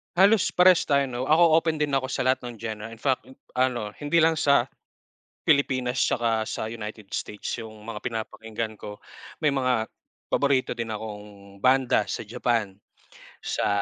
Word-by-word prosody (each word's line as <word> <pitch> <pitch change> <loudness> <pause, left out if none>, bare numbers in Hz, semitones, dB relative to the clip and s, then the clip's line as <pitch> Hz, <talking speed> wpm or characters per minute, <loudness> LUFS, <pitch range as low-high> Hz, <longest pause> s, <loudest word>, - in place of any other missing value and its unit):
Halos 200 +2 +5
parehas 180 -1 +5
tayo, 140 -1 +3
'no? 125 +2 -3
Ako, 160 +1 +6
open 160 -1 -1
din 150 -1 -1
ako 135 -1 +1
sa - - -2
lahat 130 +1 +2
ng 120 - -7
genre. 110 0 -6
In 115 - -10
fact, 130 +3 -1 0.2
ano, 125 -4 0
hindi 155 +3 +2
lang 160 -1 +3
sa 140 -3 +4 0.8
Pilipinas 130 -3 +1
tsaka 115 -3 +1
sa 110 - -4
United 110 -2 -8
States 105 - -4
yung 110 -2 -8
mga 115 0 -7
pinapakinggan 110 -1 -4
ko. 105 0 -9 0.4
May 150 - +4
mga 130 -5 0 0.4
paborito 135 -3 +1
din 115 -2 -3
akong 105 -2 -9
banda 130 +3 +3
sa - - -4
Japan, 115 -1 -1 0.7
sa, - - -1
120 Hz, 155 wpm, -26 LUFS, 110-140 Hz, 0.8 s, Ako